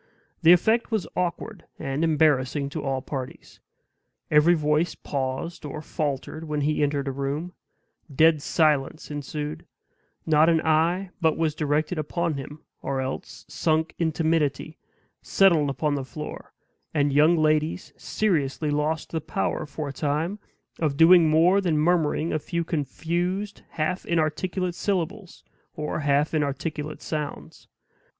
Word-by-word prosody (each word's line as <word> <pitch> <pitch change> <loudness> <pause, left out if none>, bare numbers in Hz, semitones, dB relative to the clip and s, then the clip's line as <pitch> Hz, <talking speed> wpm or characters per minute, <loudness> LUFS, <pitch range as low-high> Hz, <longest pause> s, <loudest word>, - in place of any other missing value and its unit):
The 165 0 +7
effect 220 +6 +4
was 215 -7 -1
awkward 180 +2 -3
and 135 +4 -2
embarrassing 145 -3 +2
to 155 +2 -5
all 135 -2 -2
parties. 130 -3 -7 0.7
Every 155 +4 +6
voice 150 +2 +1
paused 135 +4 -4
or 150 0 -6
faltered 155 0 -4
when 150 -1 -2
he 150 +1 0
entered 145 -1 0
a - - 0
room 140 +6 -3 0.6
dead 155 +2 +4
silence 155 -1 +1
ensued 150 +1 -5 0.6
not 155 0 +4
an 165 -1 +4
eye 170 +4 +1
but 160 -2 +2
was 160 -2 +1
directed 155 +2 -1
upon 170 +2 -1
him, 145 +2 -8 0.2
or 135 - -2
else, 130 0 -5
sunk 160 0 0
in 165 -2 +1
timidity, 155 -2 -1 0.4
settled 170 -7 +3
upon 145 +2 -1
the 140 -2 -2
floor; 150 +3 -8 0.4
and 145 -1 +2
young 155 +4 +5
ladies 155 +2 0
seriously 155 -7 -1
lost 150 +2 -1
the 160 - -2
power, 145 +6 -2
for 150 +1 -5
a - - -6
time, 155 +8 -1 0.4
of 150 -4 0
doing 165 0 +7
more 170 +6 +4
than 170 -5 +1
murmuring 160 0 +1
a 155 - 0
few 170 +3 -2
confused, 175 +6 -2
half 160 +4 -2
inarticulate 170 +3 -1
syllables, 190 +1 -3 0.3
or 150 -2 -3
half 145 +1 +1
inarticulate 150 +1 -3
sounds. 150 -2 -5
155 Hz, 135 wpm, -25 LUFS, 145-170 Hz, 0.7 s, The